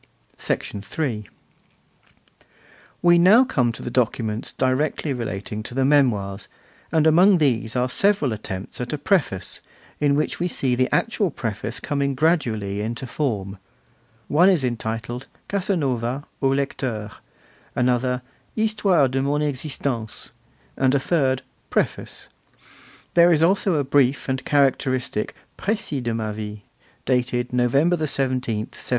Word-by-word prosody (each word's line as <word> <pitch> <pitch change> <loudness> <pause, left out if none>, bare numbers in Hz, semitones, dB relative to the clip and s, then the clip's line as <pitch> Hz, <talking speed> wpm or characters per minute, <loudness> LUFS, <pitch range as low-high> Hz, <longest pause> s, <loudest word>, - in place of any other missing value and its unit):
III. 105 +2 -3 1.8
We 175 0 +6
come - - +4 0.4
now - - +1
to 115 - -8
the 120 - -4
documents 115 -3 -1
directly 135 +3 0
relating 110 -3 -4
to 120 +3 -9
the 135 0 +2
Memoirs, 110 -9 +2 0.4
and 160 -1 +3
among 180 +5 +6
these 120 -7 +1
are 125 0 +2
several 175 - +2
attempts 100 0 -6
at 125 - -4
a - - -1
preface, 145 - 0 0.4
in 145 -1 +3
which 150 - -1
we 175 - +1
see 135 -7 0
the 130 +1 +1
actual 220 -4 +1
preface 115 -4 -4
coming 140 -1 -1
gradually 115 - +1
into 115 +4 -3
form. 105 -8 -3 0.7
One 175 +6 +5
is 175 -8 +3
entitled 120 0 -3 0.2
'Casanova 140 - -1 0.2
au 135 - +3
Lecteur', 130 -6 -2 0.6
another 125 0 +1 0.3
'Histoire 210 -9 +2
de 130 +1 -1
mon 145 +2 0
Existence', 135 -5 -3 0.4
and 130 +1 +2
a - - +3
third 135 -3 +1 0.3
Preface. - - -2 0.9
There 175 0 +6
is 160 -1 +4
also 190 +1 +3
a 145 - +1
brief 135 -1 +2
and 130 0 -2
characteristic 130 -5 +1 0.2
'Precis 195 - -1
de 120 -2 -2
ma 110 -1 -2
vie', 105 -1 -6 0.4
dated 125 -1 0
November 140 +8 +3
17, 130 -6 -1
1797. - - -10
130 Hz, 130 wpm, -23 LUFS, 115-150 Hz, 1.8 s, We